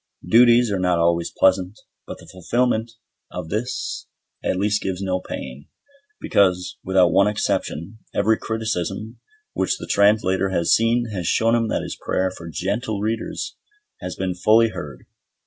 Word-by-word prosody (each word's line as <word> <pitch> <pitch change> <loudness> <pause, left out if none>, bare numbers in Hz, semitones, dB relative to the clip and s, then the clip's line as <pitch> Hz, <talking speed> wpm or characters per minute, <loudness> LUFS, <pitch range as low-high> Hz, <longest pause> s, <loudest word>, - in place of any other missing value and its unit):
Duties 120 +2 +5
are 100 - 0
not 90 -1 +2
always 85 0 +1
pleasant, 95 +2 +2 0.3
but - - -7
the - - -15
fulfilment 115 +5 -1 0.4
of 90 -3 -7
this 120 +6 -3 0.4
at - - 0
least 105 +2 +1
gives 95 -1 -3
no 95 -1 -1
pain; 65 -4 -8 0.5
because, 90 -2 +1
without 95 -2 +3
one 100 - +4
exception, 105 -2 -2
every 110 +2 +2
criticism 110 -1 -3 0.3
which - - 0
the - - -7
Translator 100 -2 +2
has 85 -3 +2
seen 115 +1 +2
has 90 -5 -3
shown 115 +1 +2
him 115 -1 +2
that - - -1
his - - -5
prayer 95 0 -1
for 85 -2 -9
"gentle" 100 +6 -2
readers 110 +2 -3 0.4
has - - -6
been 95 -1 -2
fully 110 +5 +4
heard. 70 - -8
100 Hz, 150 wpm, -22 LUFS, 90-110 Hz, 0.5 s, Duties